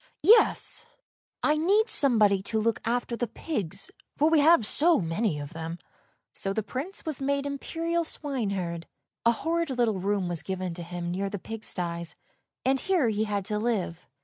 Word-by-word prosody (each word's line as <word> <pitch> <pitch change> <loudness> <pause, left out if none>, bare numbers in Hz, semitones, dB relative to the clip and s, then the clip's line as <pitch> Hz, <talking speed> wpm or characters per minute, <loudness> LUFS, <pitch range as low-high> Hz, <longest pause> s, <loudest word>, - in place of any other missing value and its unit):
— - - -44
yes, 455 +4 +4 0.6
I 300 0 +3
need 400 +8 +3
somebody 215 -8 +4
to 220 +3 -1
look 225 +1 +1
after 240 +1 0
the 240 +1 -2
pigs, 200 - -4 0.3
for 305 +2 +3
we 320 - +5
have 300 -5 +6
so 325 +9 +3
many 165 0 -1
of 145 0 -7
them." 165 +1 -5 0.6
So 195 - +1
the 220 - -1
Prince 295 - -5
was 310 -4 -2
made 280 +1 0
imperial 330 +4 -2
swineherd. 200 - -2 0.4
A - - +7
horrid 330 +6 -1
little 240 -6 +1
room 195 -1 0
was 175 -2 -1
given 185 -2 -3
him 175 0 -5
near 195 +2 -2
the 205 - -4
pig 225 +3 -7
sties, 170 -2 -3 0.5
and 265 +1 +3
here 345 -9 +2
he 215 0 0
had 205 -2 -2
to 210 0 -1
live. 205 -7 -2
220 Hz, 175 wpm, -27 LUFS, 185-290 Hz, 0.6 s, A